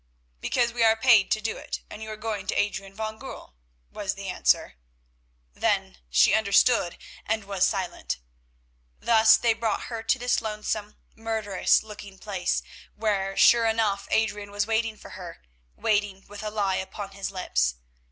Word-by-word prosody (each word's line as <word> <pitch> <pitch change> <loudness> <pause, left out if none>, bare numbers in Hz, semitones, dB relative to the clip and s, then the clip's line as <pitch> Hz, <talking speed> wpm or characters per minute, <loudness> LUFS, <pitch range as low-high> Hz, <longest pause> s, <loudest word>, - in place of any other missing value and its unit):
"Because 240 - 0
we 235 -1 +1
are 225 0 +6
paid 225 -3 +5
to 215 - +2
do 220 +1 -3
it, - - -6
and 210 - -10
you 220 - -6
are 215 - -6
going 215 -3 -4
to - - -1
Adrian 195 -1 -2
van 220 0 -4
Goorl," - - -9 0.4
was 200 -1 -3
the 195 -1 -6
answer. 65 - +1 0.8
Then - - 0
she - - +5
understood, 215 -2 +3 0.3
and 220 0 -1
was 195 -2 +1
silent. 190 -4 -3 0.8
Thus 220 -1 +6
they 230 -1 +2
brought 225 -1 -2
her 225 - -3
to 265 - +1
this 245 -1 +1
lonesome, 210 -1 -4 0.2
murderous 220 -4 +1
looking 205 -2 -10
place, 195 -2 -2 0.3
where 195 -3 -1
sure 235 -1 +6
enough 220 -3 0
Adrian 210 -2 0
was 205 0 -1
waiting 225 0 0
for - - -12
her, 180 -2 -9 0.4
waiting 205 -2 0
with 205 0 -9
a 215 - -3
lie 200 -3 0
upon 195 +1 -6
his 195 0 -4
lips. 65 - 0
210 Hz, 160 wpm, -26 LUFS, 195-220 Hz, 0.8 s, are